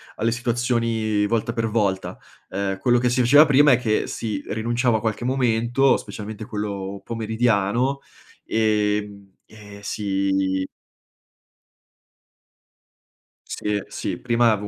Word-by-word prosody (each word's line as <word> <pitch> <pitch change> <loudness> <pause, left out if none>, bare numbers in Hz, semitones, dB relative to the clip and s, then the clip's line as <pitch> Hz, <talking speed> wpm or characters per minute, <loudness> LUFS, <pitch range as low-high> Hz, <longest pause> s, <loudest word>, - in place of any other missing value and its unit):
alle 115 +1 0
situazioni 115 -3 0
volta 115 +1 0
per 115 -1 -1
volta, 100 -4 -1 0.3
uhm, 95 0 -2
quello 120 +2 +3
che 125 0 +1
si 125 +1 0
faceva 145 +6 +7
prima 145 -1 +5
è - - +4
che 110 -3 0
si 105 -4 -4
rinunciava 120 +1 0
a - - -3
qualche 110 +1 -2
momento, 125 +1 +2
specialmente 105 0 -8
quello 100 -3 -5
pomeridiano, 115 +3 0 0.5
ehm, 105 -2 0 0.2
e 105 -2 -13
si 95 -2 -1 2.8
Sì, 105 -1 -2
sì, - - -4
prima 120 -1 +3
avevo 105 -1 -2
110 Hz, 115 wpm, -23 LUFS, 105-120 Hz, 2.8 s, faceva